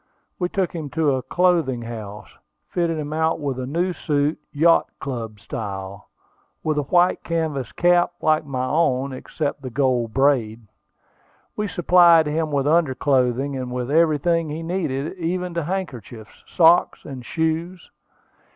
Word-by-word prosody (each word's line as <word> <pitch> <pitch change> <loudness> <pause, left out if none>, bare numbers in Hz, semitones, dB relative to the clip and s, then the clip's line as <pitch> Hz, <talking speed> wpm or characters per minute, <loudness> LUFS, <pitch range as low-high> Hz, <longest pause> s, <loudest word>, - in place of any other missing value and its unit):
We 180 -1 0
took 190 -2 -1
him 160 -4 -5
to 155 -3 +3
a 130 - -1
clothing 165 -8 +1
house, 105 -3 -8 0.3
fitted 170 -2 -1
him 150 0 -4
out 160 +1 0
with 140 -3 -3
a 125 - -4
new 175 +6 -1
suit, 150 -2 -1
yacht 165 +3 +4
club 115 -6 -5
style, 95 -1 -7 0.5
with 155 -1 0
a 140 - -4
white 180 0 +3
canvas 160 -6 -2
cap 175 0 +3
like 155 0 +2
my 130 -3 -3
own, 135 -2 +1
except 145 +2 -4
the 130 - -6
gold 125 -3 0
band. 120 -5 +1 0.9
We 210 0 -2
supplied 175 -3 +5
him 155 +1 -1
with 140 -1 0
under 155 -3 +2
clothing, 135 0 +1
and 130 -1 -4
with 125 +1 -3
everything 165 +1 +2
he 155 +2 -5
needed, 165 -2 -3
even 180 +1 -2
to 170 -2 -2
handkerchiefs, 125 - -6
socks, 170 0 +3
and 130 -4 -8
shoes. 165 +4 -3
150 Hz, 150 wpm, -22 LUFS, 130-170 Hz, 0.9 s, supplied